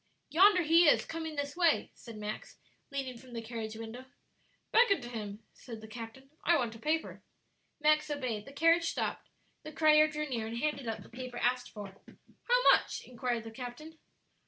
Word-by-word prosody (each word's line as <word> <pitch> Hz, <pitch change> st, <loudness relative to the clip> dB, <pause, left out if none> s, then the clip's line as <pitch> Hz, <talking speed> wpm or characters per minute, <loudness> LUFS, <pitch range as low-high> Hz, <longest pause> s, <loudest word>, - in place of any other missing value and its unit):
"Yonder 370 Hz, +2 st, +6 dB
he 330 Hz, +2 st, +6 dB
is, -, -, +3 dB
coming 320 Hz, -1 st, -5 dB
this 285 Hz, 0 st, -3 dB
way," 340 Hz, -3 st, +2 dB
said 230 Hz, -3 st, -11 dB
Max, 210 Hz, 0 st, -6 dB, 0.3 s
leaning 265 Hz, -3 st, -4 dB
from 255 Hz, 0 st, -14 dB
the 230 Hz, -, -4 dB
carriage 225 Hz, -1 st, -5 dB
window. 225 Hz, +3 st, -8 dB, 0.7 s
"Beckon 440 Hz, -6 st, +5 dB
to 240 Hz, -, -7 dB
him," 210 Hz, -2 st, -6 dB
said 230 Hz, -3 st, -10 dB
the 220 Hz, -, -11 dB
captain; 235 Hz, +4 st, -9 dB
"I 340 Hz, 0 st, +4 dB
want 240 Hz, -5 st, -1 dB
a -, -, -11 dB
paper." 315 Hz, +4 st, -2 dB, 0.6 s
Max 305 Hz, 0 st, +3 dB
obeyed; 250 Hz, -8 st, -3 dB
the -, -, -11 dB
carriage 330 Hz, +3 st, +3 dB
stopped, -, -, -3 dB, 0.3 s
the 310 Hz, -, -8 dB
crier 305 Hz, 0 st, +5 dB
drew 300 Hz, 0 st, -3 dB
near 230 Hz, -5 st, -3 dB
and 230 Hz, +1 st, -5 dB
handed 280 Hz, -1 st, -2 dB
up 225 Hz, -, -4 dB
the -, -, -16 dB
paper 250 Hz, 0 st, -7 dB
asked 245 Hz, 0 st, 0 dB
for. 205 Hz, -2 st, -8 dB, 0.6 s
"How -, -, +3 dB
much?" -, -, +1 dB
inquired 245 Hz, -2 st, -2 dB
the 225 Hz, -, -8 dB
captain. 260 Hz, +7 st, -9 dB
260 Hz, 180 wpm, -32 LUFS, 230-310 Hz, 0.7 s, Yonder